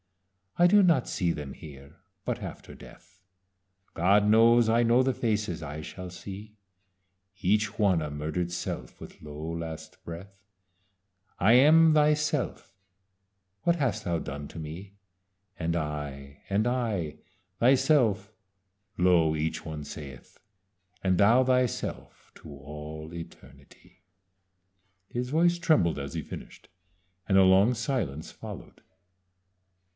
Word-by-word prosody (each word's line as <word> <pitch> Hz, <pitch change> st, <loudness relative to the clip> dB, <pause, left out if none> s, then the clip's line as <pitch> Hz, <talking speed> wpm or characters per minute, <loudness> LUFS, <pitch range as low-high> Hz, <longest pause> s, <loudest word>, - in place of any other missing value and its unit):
I 175 Hz, -, +5 dB
do 205 Hz, +2 st, +6 dB
not 165 Hz, -9 st, +3 dB
see 90 Hz, -3 st, 0 dB
them 75 Hz, -4 st, -6 dB
here; 70 Hz, +2 st, -13 dB, 0.3 s
but -, -, -3 dB
after -, -, -8 dB
death 95 Hz, -1 st, -16 dB, 0.7 s
God 100 Hz, +4 st, +3 dB
knows 115 Hz, +2 st, +5 dB
I 115 Hz, +1 st, +3 dB
know 120 Hz, +2 st, +4 dB
the 130 Hz, 0 st, +1 dB
faces 105 Hz, -8 st, -2 dB
I 75 Hz, +1 st, -6 dB
shall 90 Hz, +4 st, -8 dB
see 100 Hz, +4 st, -10 dB, 0.8 s
Each 105 Hz, +2 st, +1 dB
one 95 Hz, -6 st, +3 dB
a 75 Hz, -, -3 dB
murder'd 80 Hz, +4 st, -3 dB
self, 85 Hz, -, -5 dB
with -, -, -12 dB
low 75 Hz, +2 st, -7 dB
last 80 Hz, -1 st, -7 dB
breath; 100 Hz, +4 st, -10 dB, 1.0 s
'I 105 Hz, +5 st, +5 dB
am 155 Hz, +5 st, +6 dB
thyself 150 Hz, -8 st, 0 dB, 0.9 s
what 170 Hz, +7 st, +2 dB
hast 135 Hz, -7 st, -1 dB
thou 85 Hz, -1 st, -1 dB
done 70 Hz, -1 st, -6 dB
to 80 Hz, -, -9 dB
me?' 90 Hz, +6 st, -9 dB, 0.6 s
'And 85 Hz, 0 st, -1 dB
I 75 Hz, -3 st, -5 dB
and 105 Hz, +4 st, +1 dB
I 105 Hz, -12 st, -2 dB, 0.4 s
thyself' 125 Hz, -5 st, +3 dB, 0.6 s
(lo! 85 Hz, -3 st, +3 dB
each 80 Hz, +1 st, -2 dB
one 80 Hz, -2 st, -6 dB
saith) 70 Hz, -3 st, -10 dB, 0.7 s
'And 95 Hz, -2 st, +2 dB
thou 115 Hz, +7 st, +5 dB
thyself 125 Hz, -1 st, -2 dB
to 80 Hz, -, -12 dB
all 75 Hz, +3 st, -9 dB
eternity.'" 85 Hz, -1 st, -13 dB, 1.1 s
His 125 Hz, +3 st, -4 dB
voice 170 Hz, +4 st, +3 dB
trembled 110 Hz, -, +2 dB
as 70 Hz, +3 st, -6 dB
he 80 Hz, -, -2 dB
finished, -, -, -10 dB, 0.6 s
and 95 Hz, -, +4 dB
a 95 Hz, -, +7 dB
long 95 Hz, +5 st, +5 dB
silence 110 Hz, -, -3 dB
followed. -, -, -10 dB
95 Hz, 125 wpm, -28 LUFS, 80-120 Hz, 1.1 s, a